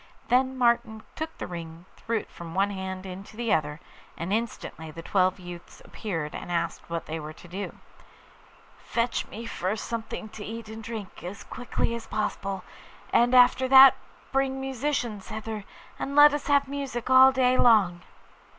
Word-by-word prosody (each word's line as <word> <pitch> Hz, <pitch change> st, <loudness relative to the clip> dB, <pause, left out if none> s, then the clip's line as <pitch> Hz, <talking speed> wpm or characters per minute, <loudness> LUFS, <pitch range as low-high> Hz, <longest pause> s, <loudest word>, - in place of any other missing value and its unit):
Then 260 Hz, +1 st, +3 dB
Martin 235 Hz, -3 st, +2 dB
took 320 Hz, +1 st, -5 dB
the -, -, -4 dB
ring, 165 Hz, -1 st, -8 dB
and -, -, -29 dB
threw 230 Hz, 0 st, -2 dB
it -, -, -6 dB
from 170 Hz, 0 st, -9 dB
one 200 Hz, +1 st, +2 dB
hand 190 Hz, -1 st, -5 dB
into 195 Hz, +3 st, -9 dB
the 235 Hz, -2 st, +1 dB
other, 150 Hz, -1 st, 0 dB, 0.4 s
and 170 Hz, +4 st, -3 dB
instantly 215 Hz, -7 st, -3 dB
the 165 Hz, +2 st, -9 dB
twelve 185 Hz, +1 st, +2 dB
youths 175 Hz, -1 st, -10 dB
appeared 165 Hz, -8 st, -4 dB
and -, -, -6 dB
asked 170 Hz, -1 st, -2 dB
what 170 Hz, -1 st, -3 dB
they 160 Hz, +1 st, -4 dB
were 155 Hz, 0 st, -7 dB
to 175 Hz, -, -14 dB
do. 190 Hz, +4 st, -6 dB, 1.0 s
'Fetch 235 Hz, 0 st, -1 dB
me 230 Hz, +2 st, -8 dB
first 205 Hz, -1 st, -3 dB
something 225 Hz, -1 st, -5 dB
to 210 Hz, 0 st, -9 dB
eat 225 Hz, +1 st, -7 dB
and 220 Hz, 0 st, -8 dB
drink, 220 Hz, -3 st, -7 dB
as 185 Hz, +4 st, -7 dB
quickly 245 Hz, -1 st, -2 dB
as 230 Hz, -1 st, -6 dB
possible; 195 Hz, -2 st, -3 dB, 0.5 s
and 240 Hz, +2 st, +4 dB
after 250 Hz, +1 st, +6 dB
that 265 Hz, +1 st, +9 dB, 0.4 s
bring 270 Hz, 0 st, 0 dB
musicians 265 Hz, -6 st, -2 dB
hither, 220 Hz, -1 st, -5 dB, 0.3 s
and 280 Hz, -, -3 dB
let 295 Hz, 0 st, +8 dB
us 290 Hz, -, -3 dB
have 285 Hz, -1 st, +3 dB
music 270 Hz, -3 st, -4 dB
all 260 Hz, +1 st, +9 dB
day 255 Hz, -1 st, +3 dB
long. 200 Hz, -9 st, +4 dB
220 Hz, 170 wpm, -27 LUFS, 185-250 Hz, 1.0 s, that